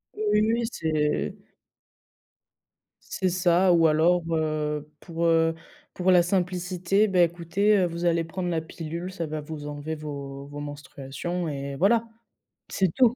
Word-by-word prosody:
Oui, 215 - -4 0.2
oui, 220 +1 +2
oui 235 0 0
c'est 155 -2 0 1.8
C'est 185 - 0
ça 180 +1 +3
ou 165 -1 +5
alors, 165 +3 +3
heu, 150 -1 -1
pour, 170 -1 -3
heu, 165 0 +3 0.4
pour 185 +1 +2
la 175 -1 +6
simplicité 180 +2 +1
«Bah, 185 -2 +3
écoutez, 175 +5 +2
heu, 185 - +3
vous 170 0 -3
allez 170 -1 +2
prendre 175 +2 -4
la 165 -2 0
pilule, 170 +2 -6
ça 170 -3 -4
va 155 +1 -4
vous 150 -1 -7
enlever 150 +2 -5
vos 140 -2 -7
vos 145 0 -8
menstruations 145 +4 -5
et 140 -1 -4
voilà». 215 +9 +3 0.7
C'est 190 -2 +1
tout. 245 -2 +4
170 Hz, 150 wpm, -26 LUFS, 150-180 Hz, 1.8 s, la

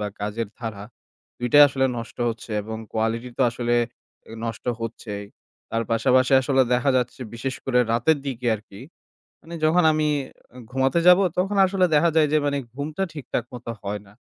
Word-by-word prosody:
বা 105 - -2
কাজের 105 +2 -3
ধারা, 110 -4 -6 0.5
২ 120 - -2
টাই 145 - +9
আসলে 135 0 0
নষ্ট 115 - -8
হচ্ছে 115 0 -6
এবং 110 +2 -6 0.2
কোয়ালিটি 115 +2 -1
তো - - +4
আসলে 120 0 -1 0.7
নষ্ট 115 -1 -5 0.2
হচ্ছেই। 105 -2 -6 0.5
তার 115 - 0
পাশাপাশি 130 +3 +3
আসলে 135 0 +3
দেখা 125 +3 +2
যাচ্ছে, 125 +1 -2
বিশেষ 130 +3 -3
করে 125 -2 +2
রাতের 135 +7 +2
দিকে 125 -2 -4
আর 105 - -6
কি, 100 - -12 0.6
মানে, 170 +1 -9
যখন 175 +3 +4
আমি 155 0 +1 0.6
ঘুমাতে 135 +5 +1
যাব, 180 +1 +8 0.2
তখন 195 +3 0
আসলে 185 -1 +2
দেখা 165 +3 +4
যায় 155 -2 +5
যে, - - +5
মানে, 140 0 0 0.2
ঘুমটা 150 +7 -3
ঠিকঠাক 140 -5 -3
মতো 120 -1 -6
হয় 105 +1 -4
না। 100 - -18
125 Hz, 170 wpm, -23 LUFS, 115-145 Hz, 0.7 s, টাই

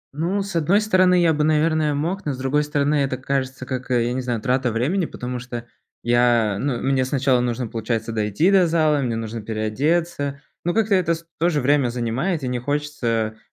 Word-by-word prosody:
Ну, 180 +6 -1
с 195 -2 -7
одной 170 +5 +3
стороны, 185 -4 +3
я 170 -2 +4
бы, 150 0 0
наверное, 155 -1 +2
мог, 170 +7 -2
но 145 - -1
с - - -7
другой 135 +3 +1
стороны, 145 0 0
это 130 -1 -2
кажется, 135 0 -3
как, 130 -1 -5
э, 120 -2 +2
я 120 - -1
не 130 - -2
знаю, 120 -2 -2
трата 130 -1 +1
времени. 155 - 0
Потому 125 0 -5
что 120 -1 -7 0.4
я 120 -3 +3
ну, 135 -1 -1
мне 135 -1 +2
сначала 130 -1 +1
нужно, 120 0 -1
получается, 115 0 -3
дойти 110 - +1
до 190 -3 +5
зала, 155 -3 +2
мне 120 -4 -1
нужно 115 0 -5
переодеться, 140 +8 -1 0.3
но 175 - +1
как-то 220 -2 +2
это 175 -3 +2
с 165 +1 -12
тоже 165 -3 +2
время 140 -1 +2
занимает, 125 +8 -2
и - - -2
не 125 -1 -2
хочется 120 -5 -2
135 Hz, 200 wpm, -22 LUFS, 120-160 Hz, 0.4 s, до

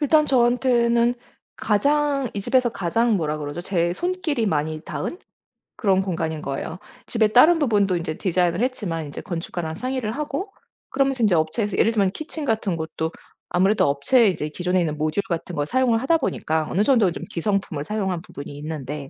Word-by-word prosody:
일단 305 +1 +4
저한테는 240 -2 +3 0.4
가장 280 +4 +1
이 200 - -2
집에서 250 +4 +2
가장 225 +3 +1
뭐라고 155 -3 -2
그러죠 145 +4 -5
제 175 -2 0
손길이 325 - -1
많이 155 -2 -1
닿은 340 - -5 0.6
그런 190 -3 +2
공간인 165 -4 -3
거예요. 150 +4 -4 0.3
집에 220 -2 +2
다른 310 +10 +6
부분도 205 - +2
인제 165 -2 -3
디자인을 180 -1 +1
했지만 200 -11 -2
인제 145 - -7
건축가랑 165 -2 -4
상의를 255 0 -2
하고 300 - -4 0.4
그러면서 270 -3 +1
인제 195 -5 +4
업체에서 185 +6 0
예를 225 - +4
들면 195 -4 +2
키친 310 +4 -6
같은 220 -8 0
것도 160 0 -3 0.4
아무래도 195 +4 +3
업체에 180 - +3
이제 155 -5 -1
기존에 180 +3 0
있는 155 -3 -1
모듈 155 +6 0
같은 170 0 -3
걸 145 - 0
사용을 240 - +2
하다 330 +6 +3
보니까 160 - -1
어느 200 +4 +2
정도 225 -9 +4
좀 - - -7
기성품을 180 -4 -1
사용한 190 -4 -2
부분이 140 - -9
있는데 150 -2 -6
195 Hz, 400 characters per minute, -23 LUFS, 165-245 Hz, 0.6 s, 다른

